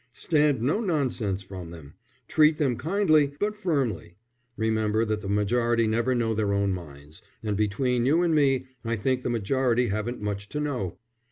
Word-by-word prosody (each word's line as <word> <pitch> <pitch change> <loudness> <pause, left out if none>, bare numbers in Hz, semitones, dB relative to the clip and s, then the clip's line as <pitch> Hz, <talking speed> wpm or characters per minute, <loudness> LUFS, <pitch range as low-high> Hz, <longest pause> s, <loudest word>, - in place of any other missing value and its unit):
Stand 145 -6 +1
no 145 - +1
nonsense 125 - -1
from 95 -3 -8
them. 80 -4 -11 0.3
Treat 155 0 +4
them 135 -5 +1
kindly, 155 - +2
but 210 +1 -1
firmly. 130 - -2 0.4
Remember 110 0 +1
that 110 -1 -2
the 100 - -5
majority 115 +3 +1
never 120 +4 +1
know 115 -2 0
their 105 -2 0
own 100 -1 +1
minds, 75 -3 -10 0.2
and 105 -2 -1
between 120 +4 +1
you 165 +5 +3
and 170 -2 +2
me 135 -4 +2 0.2
I 115 0 -1
think 130 +4 0
the - - -2
majority 120 +2 +1
haven't 110 +4 -3
much 105 -1 -4
to 150 - -3
know." 130 - -3
115 Hz, 170 wpm, -26 LUFS, 100-140 Hz, 0.4 s, Treat